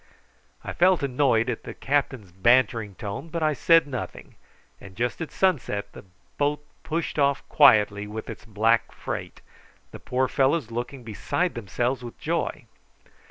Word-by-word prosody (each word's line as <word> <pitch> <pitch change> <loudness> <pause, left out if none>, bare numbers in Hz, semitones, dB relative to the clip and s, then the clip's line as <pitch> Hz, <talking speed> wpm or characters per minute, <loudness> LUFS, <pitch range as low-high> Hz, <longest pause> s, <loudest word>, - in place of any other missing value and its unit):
I - - -5
felt 180 -2 +3
annoyed 125 -4 +2
at - - -2
the - - -8
captain's 130 -8 -1
bantering 110 +1 +2
tone, 115 - -6
but 165 -1 -3
I 155 -1 +2
said 165 +3 +4
nothing; 135 -4 -7 0.5
and 95 -2 -13
just 120 - -2
at 160 - -4
sunset 145 - 0
the - - -12 0.3
boat 145 +1 0 0.2
pushed 165 -1 -3
off 140 -1 +1
quietly 105 -7 +5
with 110 +1 -6
its - - -8
black 115 +1 +1
freight, - - -6 0.5
the - - -9
poor 130 +1 0
fellows 135 -2 +1
looking 120 +3 -5
beside 140 - -2
themselves 120 +4 -2
with 120 - -9
joy. - - -2
125 Hz, 150 wpm, -25 LUFS, 110-145 Hz, 0.5 s, quietly